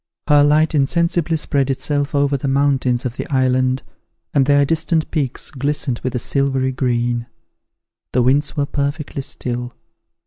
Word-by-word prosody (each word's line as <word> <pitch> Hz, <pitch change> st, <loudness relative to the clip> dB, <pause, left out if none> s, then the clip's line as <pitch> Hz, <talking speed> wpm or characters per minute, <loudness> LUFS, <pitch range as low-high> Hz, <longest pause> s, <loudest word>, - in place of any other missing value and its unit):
Her 145 Hz, -1 st, +6 dB
light 155 Hz, +2 st, +3 dB
insensibly 165 Hz, +3 st, +1 dB
spread 140 Hz, -3 st, 0 dB
itself 145 Hz, +2 st, -1 dB
over 140 Hz, 0 st, +2 dB
the 140 Hz, +1 st, -3 dB
mountains 135 Hz, -2 st, +1 dB
of 125 Hz, 0 st, -4 dB
the -, -, -4 dB
island, 130 Hz, -1 st, +1 dB, 0.5 s
and 135 Hz, -1 st, +3 dB
their 145 Hz, 0 st, +4 dB
distant 160 Hz, +1 st, 0 dB
peaks 140 Hz, -6 st, -2 dB
glistened 140 Hz, -2 st, -1 dB
with 130 Hz, 0 st, -4 dB
a -, -, +2 dB
silvery 135 Hz, +1 st, 0 dB
green. 120 Hz, -2 st, -1 dB, 0.8 s
The 125 Hz, -, +2 dB
winds 140 Hz, +5 st, +2 dB
were 145 Hz, -, +1 dB
perfectly 140 Hz, 0 st, -3 dB
still. 120 Hz, -2 st, -4 dB
140 Hz, 145 wpm, -19 LUFS, 130-145 Hz, 0.8 s, Her